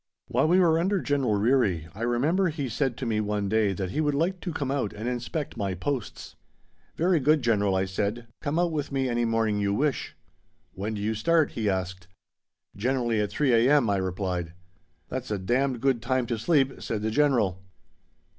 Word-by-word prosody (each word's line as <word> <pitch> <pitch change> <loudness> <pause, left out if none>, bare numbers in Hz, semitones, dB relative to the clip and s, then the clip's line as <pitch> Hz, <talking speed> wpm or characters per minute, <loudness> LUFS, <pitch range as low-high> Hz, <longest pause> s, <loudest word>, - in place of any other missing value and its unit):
While 130 +5 +2
we 180 +3 +4
were 165 -3 +4
under 190 +3 +1
General 140 -9 0
Ryrie 105 - +2
I 105 - -10
remember 145 +11 +1
he 145 -4 -3
said 125 +1 -1
to 130 - -4
me 110 -2 0
one 105 -1 -1
day 110 0 +2
that 95 -1 -4
he 155 - 0
would 145 -2 +1
like 175 +5 0
to 175 - -4
come 140 -4 -3
out 135 -7 -1
and 110 +3 -5
inspect 125 +4 -3
my 100 -3 -2
posts. 125 +5 -4 0.6
"Very 175 0 +2
good, 150 +1 +3
General," 105 -4 +2
I 95 0 +1
said. 105 +5 -2 0.2
"Come 150 +1 -1
out 175 -1 +2
with 150 -3 -3
me 135 -1 0
any 120 -1 0
morning 115 -2 +1
you 100 0 0
wish." 145 +2 -1 0.6
"When 105 +3 -4
do 100 - -4
you 110 +1 0
start?" 160 +9 +2
he 110 -3 -1
asked. 95 -1 -3 0.7
"Generally 120 0 0
at 105 - -1
3 140 -4 +1
a.m.," 120 0 +4
I 100 - +1
replied. 90 -3 -3 0.6
"That's 130 0 -4
a 105 - -1
d 95 +5 0
d 130 -3 -3
good 130 -1 +1
time 130 +1 0
to 115 -1 -3
sleep," 135 +1 +1
said 105 -2 -3
the 110 - 0
General. 115 -10 +2
120 Hz, 200 wpm, -26 LUFS, 105-145 Hz, 0.7 s, we